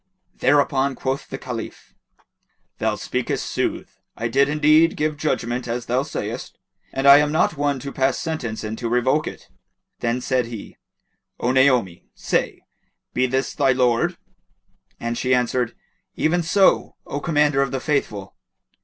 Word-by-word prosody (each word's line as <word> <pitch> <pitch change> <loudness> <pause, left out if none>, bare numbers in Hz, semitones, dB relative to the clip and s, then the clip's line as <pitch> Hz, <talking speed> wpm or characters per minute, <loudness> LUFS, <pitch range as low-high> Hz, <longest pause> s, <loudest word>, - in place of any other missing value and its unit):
Thereupon 140 -2 +2
quoth 135 +2 -3
the 135 - -5
Caliph, 125 -4 -7 0.9
"Thou - - 0
speakest - - -2
sooth: - - -3 0.2
I 115 +1 -2
did 140 +3 +3
indeed 155 +2 +4
give 155 0 0
judgement 125 -5 -2
as 120 +1 -3
thou 125 +2 +1
sayst, 150 +2 -5 0.3
and 135 - -2
I 140 0 +10
am 150 0 +1
not 160 +1 +2
one 145 -1 0
to 140 - -6
pass 135 -1 +1
sentence 135 -11 -4
and 110 +1 -4
to 115 - -2
revoke 130 +5 +1
it." - - -8 0.5
Then 120 +1 0
said 125 -1 0
he, 115 -3 -9 0.6
"O 125 - +1
Naomi, 125 -9 +2
say, - - -1 0.5
be 130 +1 +2
this 130 +2 -1
thy 135 -3 +3
lord?" 125 -2 +1 0.8
And 115 0 -3
she 130 0 +2
answered 125 -1 0 0.4
"Even 175 +3 +1
so, 190 +4 +3
O 145 - -4
Commander 150 -3 +2
of 140 - +1
the 135 - -2
Faithful." 110 -10 -2
135 Hz, 150 wpm, -22 LUFS, 120-145 Hz, 0.9 s, I